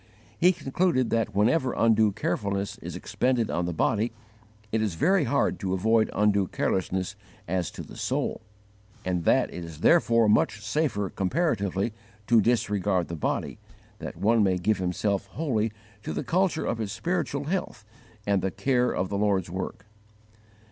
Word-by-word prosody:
He 180 Hz, +2 st, +6 dB
concluded 145 Hz, -5 st, 0 dB
that 110 Hz, -3 st, 0 dB
whenever 125 Hz, +6 st, +2 dB
undue 110 Hz, -2 st, +4 dB
carefulness 100 Hz, 0 st, -2 dB
is -, -, -7 dB
expended 125 Hz, -3 st, 0 dB
on 85 Hz, -, 0 dB
the 90 Hz, -, -2 dB
body, 110 Hz, +7 st, +1 dB, 0.6 s
it 110 Hz, -, +1 dB
is 105 Hz, -6 st, -1 dB
very 175 Hz, -, +3 dB
hard 140 Hz, -, +1 dB
to 95 Hz, -3 st, -1 dB
avoid 110 Hz, +3 st, +2 dB
undue 100 Hz, -2 st, +2 dB
carelessness 95 Hz, +2 st, -1 dB, 0.3 s
as 90 Hz, -2 st, -1 dB
to -, -, -8 dB
the -, -, -12 dB
soul; -, -, -2 dB, 0.6 s
and 90 Hz, -2 st, -1 dB
that -, -, +3 dB
it 90 Hz, -, -6 dB
is 80 Hz, -2 st, -9 dB
therefore 115 Hz, -, +4 dB
much 105 Hz, +1 st, +3 dB
safer 110 Hz, -, 0 dB
comparatively 100 Hz, -, 0 dB, 0.3 s
to 115 Hz, 0 st, +5 dB
disregard 105 Hz, -5 st, +1 dB
the 85 Hz, -, -4 dB
body, 75 Hz, -, -2 dB, 0.4 s
that -, -, -7 dB
one 110 Hz, +5 st, +3 dB
may 95 Hz, -3 st, +3 dB
give 100 Hz, +3 st, +1 dB
himself 100 Hz, +2 st, -1 dB
wholly 115 Hz, -8 st, 0 dB, 0.3 s
to -, -, -4 dB
the -, -, -2 dB
culture 170 Hz, +4 st, +1 dB
of 115 Hz, -, -2 dB
his 105 Hz, -3 st, -3 dB
spiritual 155 Hz, -, -2 dB
health 155 Hz, -, -3 dB, 0.4 s
and 100 Hz, -2 st, +2 dB
the 95 Hz, -, 0 dB
care 125 Hz, +4 st, +1 dB
of 95 Hz, -, -1 dB
the 100 Hz, -, -2 dB
Lord's 95 Hz, -4 st, +1 dB
work. 95 Hz, +2 st, -5 dB
105 Hz, 160 wpm, -27 LUFS, 95-125 Hz, 0.6 s, He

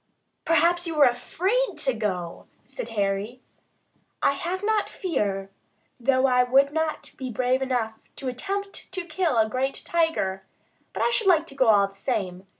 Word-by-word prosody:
"Perhaps 340 Hz, +2 st, +3 dB
you 320 Hz, -2 st, -3 dB
are 285 Hz, -, +8 dB
afraid 375 Hz, -, 0 dB
to 265 Hz, -, +1 dB
go," 185 Hz, -6 st, -4 dB, 0.2 s
said -, -, -6 dB
Harry. 200 Hz, +4 st, -1 dB, 0.8 s
"I -, -, +5 dB
have 350 Hz, +7 st, -3 dB
not 435 Hz, 0 st, +1 dB
fear, 195 Hz, -, -2 dB, 0.5 s
though 260 Hz, +2 st, +3 dB
I 250 Hz, -1 st, +4 dB
would 270 Hz, +3 st, +3 dB
not 320 Hz, -1 st, -2 dB
be 260 Hz, -1 st, -5 dB
brave 255 Hz, +3 st, +1 dB
enough 245 Hz, -4 st, -1 dB, 0.2 s
to 270 Hz, -, -6 dB
attempt 395 Hz, +13 st, -4 dB
to 370 Hz, -2 st, -3 dB
kill 320 Hz, -4 st, 0 dB
a 220 Hz, -1 st, +4 dB
great 260 Hz, +4 st, -2 dB
tiger; 320 Hz, -, 0 dB, 0.5 s
but -, -, -2 dB
I -, -, +2 dB
should 455 Hz, -4 st, +1 dB
like 330 Hz, -4 st, +5 dB
to 275 Hz, -, -12 dB
go 260 Hz, -3 st, +3 dB
all 205 Hz, -2 st, +5 dB
the -, -, -20 dB
same. 195 Hz, -4 st, -3 dB
265 Hz, 165 wpm, -25 LUFS, 220-340 Hz, 0.8 s, are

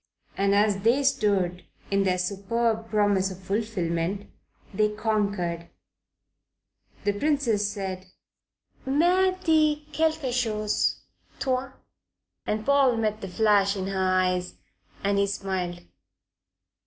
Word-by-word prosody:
And 200 Hz, 0 st, +2 dB
as 205 Hz, -1 st, +3 dB
they 235 Hz, +7 st, +2 dB
stood, 190 Hz, -8 st, +1 dB, 0.3 s
in 195 Hz, 0 st, +2 dB
their 185 Hz, -1 st, +2 dB
superb 220 Hz, +4 st, -1 dB
promise 205 Hz, -3 st, +2 dB
of 185 Hz, -, -8 dB
fulfilment, 190 Hz, -2 st, -2 dB, 0.4 s
they 210 Hz, +2 st, +2 dB
conquered. 200 Hz, -6 st, -1 dB, 1.3 s
The 205 Hz, 0 st, +1 dB
Princess 230 Hz, -4 st, +1 dB
said: 190 Hz, -2 st, -5 dB, 0.8 s
"Mais 355 Hz, +7 st, +3 dB
dis 310 Hz, -2 st, +3 dB, 0.2 s
quelque 315 Hz, -5 st, 0 dB
chose, 215 Hz, -4 st, 0 dB, 0.4 s
toi." 260 Hz, 0 st, -1 dB, 0.7 s
And 215 Hz, 0 st, -1 dB
Paul 275 Hz, -4 st, +4 dB
met 215 Hz, -1 st, -1 dB
the 195 Hz, -, -5 dB
flash 200 Hz, 0 st, +3 dB
in 190 Hz, -1 st, -3 dB
her 195 Hz, -1 st, -2 dB
eyes, 185 Hz, -1 st, +1 dB, 0.5 s
and 200 Hz, 0 st, +1 dB
he 200 Hz, -, +2 dB
smiled. 185 Hz, -3 st, -3 dB
205 Hz, 110 wpm, -26 LUFS, 190-235 Hz, 1.3 s, Paul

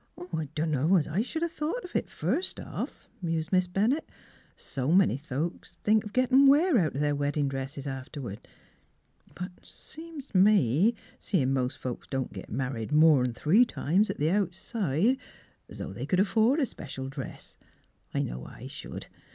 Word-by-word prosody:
" 180 Hz, 0 st, -10 dB
I 160 Hz, -1 st, -1 dB
dunno's 155 Hz, +2 st, +2 dB
I 170 Hz, +7 st, 0 dB
should 320 Hz, +7 st, -3 dB
have 340 Hz, -, -1 dB
thought 330 Hz, +10 st, -3 dB
of 360 Hz, -, -11 dB
it, -, -, 0 dB
first 365 Hz, -, 0 dB
off," -, -, -6 dB
mused 165 Hz, -1 st, -2 dB
Miss 185 Hz, -1 st, +3 dB
Bennett. 215 Hz, -, 0 dB, 0.3 s
" -, -, -32 dB
So 135 Hz, +2 st, -3 dB
many 185 Hz, -6 st, +5 dB
folks 150 Hz, +4 st, -4 dB
think 215 Hz, 0 st, +4 dB
of 210 Hz, -, -8 dB
gettin' 255 Hz, +3 st, +5 dB
wear 295 Hz, 0 st, +5 dB
out 155 Hz, -7 st, 0 dB
of 140 Hz, -, -1 dB
their 145 Hz, 0 st, +2 dB
weddin' 145 Hz, 0 st, 0 dB
dresses 135 Hz, +1 st, -5 dB
afterward. 130 Hz, -5 st, -6 dB, 0.9 s
But 180 Hz, +1 st, -5 dB
seems 320 Hz, -3 st, -11 dB
t' 185 Hz, -, +2 dB
me 195 Hz, -, +4 dB, 0.2 s
seein' 135 Hz, -10 st, +1 dB
mos' 130 Hz, -1 st, 0 dB
folks 125 Hz, -2 st, -6 dB
don't 135 Hz, -1 st, -2 dB
get -, -, -9 dB
mar 130 Hz, 0 st, -1 dB
ried 115 Hz, +2 st, -5 dB
more'n 150 Hz, -5 st, +5 dB
three 185 Hz, -, +5 dB
times 200 Hz, -, +1 dB
at -, -, -3 dB
the 155 Hz, +3 st, +1 dB
outside, 200 Hz, -, +1 dB, 0.5 s
's -, -, -9 dB
though -, -, -5 dB
they -, -, -5 dB
c'd 185 Hz, -, +2 dB
afford 225 Hz, +8 st, +3 dB
a 285 Hz, -, +3 dB
special 135 Hz, -, -7 dB
dress. 135 Hz, -, -8 dB, 0.6 s
I -, -, 0 dB
know -, -, -5 dB
I -, -, -11 dB
should. -, -, -7 dB
170 Hz, 175 wpm, -28 LUFS, 140-220 Hz, 0.9 s, many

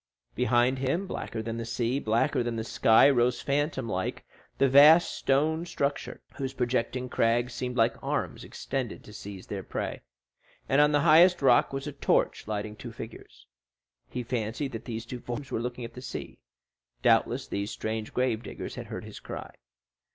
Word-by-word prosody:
Behind 125 Hz, +1 st, +2 dB
him, 135 Hz, +9 st, 0 dB
blacker 115 Hz, -10 st, -5 dB
than 115 Hz, 0 st, -4 dB
the 115 Hz, -, -3 dB
sea, 120 Hz, +3 st, -1 dB
blacker 115 Hz, 0 st, +1 dB
than 120 Hz, -1 st, -2 dB
the 110 Hz, -, -2 dB
sky, 110 Hz, +2 st, +5 dB
rose 125 Hz, -3 st, +3 dB
phantom 140 Hz, -3 st, -1 dB
like 95 Hz, -3 st, -3 dB, 0.3 s
the 135 Hz, -, +4 dB
vast 150 Hz, +6 st, +7 dB
stone 155 Hz, +4 st, +1 dB
structure, 145 Hz, -4 st, -3 dB
whose 135 Hz, -1 st, -4 dB
projecting 125 Hz, 0 st, -1 dB
crags 120 Hz, +1 st, +1 dB
seemed 125 Hz, 0 st, -4 dB
like 115 Hz, 0 st, +2 dB
arms -, -, -2 dB
extended 130 Hz, -4 st, -4 dB
to 105 Hz, -, -13 dB
seize 100 Hz, -3 st, -9 dB
their 100 Hz, -2 st, -5 dB
prey, -, -, -4 dB, 0.7 s
and 135 Hz, +2 st, +4 dB
on 150 Hz, 0 st, +5 dB
the 145 Hz, -1 st, +3 dB
highest 170 Hz, +1 st, +6 dB
rock 125 Hz, -3 st, +5 dB
was 135 Hz, 0 st, -4 dB
a 150 Hz, -, -4 dB
torch -, -, 0 dB
lighting 105 Hz, 0 st, -3 dB
two 120 Hz, +2 st, -8 dB
figures. 110 Hz, -, -11 dB, 0.6 s
He 125 Hz, -, -4 dB
fancied 120 Hz, +3 st, -3 dB
that 115 Hz, -2 st, -7 dB
these 115 Hz, -2 st, -5 dB
two 125 Hz, +2 st, -6 dB
forms 120 Hz, +4 st, -6 dB
were 115 Hz, -, -1 dB
looking 125 Hz, 0 st, -4 dB
at 115 Hz, -, -10 dB
the 125 Hz, -, -9 dB
sea; 130 Hz, -, -7 dB, 0.6 s
doubtless -, -, +3 dB
these 100 Hz, +1 st, -3 dB
strange 110 Hz, 0 st, -4 dB
grave 125 Hz, -3 st, 0 dB
diggers -, -, -7 dB
had -, -, -7 dB
heard -, -, -6 dB
his -, -, -9 dB
cry. -, -, -8 dB
125 Hz, 175 wpm, -28 LUFS, 115-135 Hz, 0.7 s, vast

